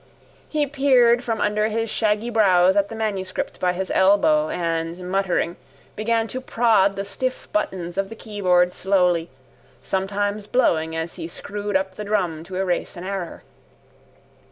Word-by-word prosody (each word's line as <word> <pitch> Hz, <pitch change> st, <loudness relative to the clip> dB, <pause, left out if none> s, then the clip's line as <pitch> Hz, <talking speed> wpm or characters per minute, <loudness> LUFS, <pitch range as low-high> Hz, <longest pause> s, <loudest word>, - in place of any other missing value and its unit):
He 300 Hz, -1 st, +1 dB
peered 260 Hz, -4 st, +3 dB
from 225 Hz, -2 st, -2 dB
under 210 Hz, +1 st, +1 dB
his 225 Hz, +1 st, -1 dB
shaggy 215 Hz, +1 st, 0 dB
brows 190 Hz, -4 st, +4 dB
at 200 Hz, 0 st, +2 dB
the 225 Hz, -, -7 dB
manuscript 200 Hz, -4 st, -3 dB
by 180 Hz, -1 st, +1 dB
his 190 Hz, +1 st, -3 dB
elbow 160 Hz, -6 st, +4 dB
and, 165 Hz, -1 st, -2 dB
muttering, 185 Hz, -3 st, 0 dB, 0.4 s
began 225 Hz, +1 st, 0 dB
to 255 Hz, -, -4 dB
prod 225 Hz, -6 st, +2 dB
the 195 Hz, -, -4 dB
stiff 255 Hz, +6 st, -4 dB
buttons 185 Hz, -3 st, -2 dB
of 195 Hz, 0 st, -1 dB
the 225 Hz, -, -8 dB
keyboard 180 Hz, -5 st, +1 dB
slowly, 180 Hz, -3 st, +1 dB, 0.5 s
sometimes 205 Hz, +2 st, -2 dB
blowing 160 Hz, -10 st, +1 dB
as 160 Hz, +1 st, -4 dB
he -, -, -5 dB
screwed 205 Hz, +3 st, -3 dB
up 190 Hz, 0 st, -4 dB
the 210 Hz, -, -6 dB
drum 180 Hz, -7 st, -1 dB
to 185 Hz, -, -8 dB
erase 185 Hz, -1 st, -2 dB
an 175 Hz, -, -7 dB
error. 190 Hz, -3 st, -5 dB
195 Hz, 155 wpm, -22 LUFS, 180-215 Hz, 0.5 s, brows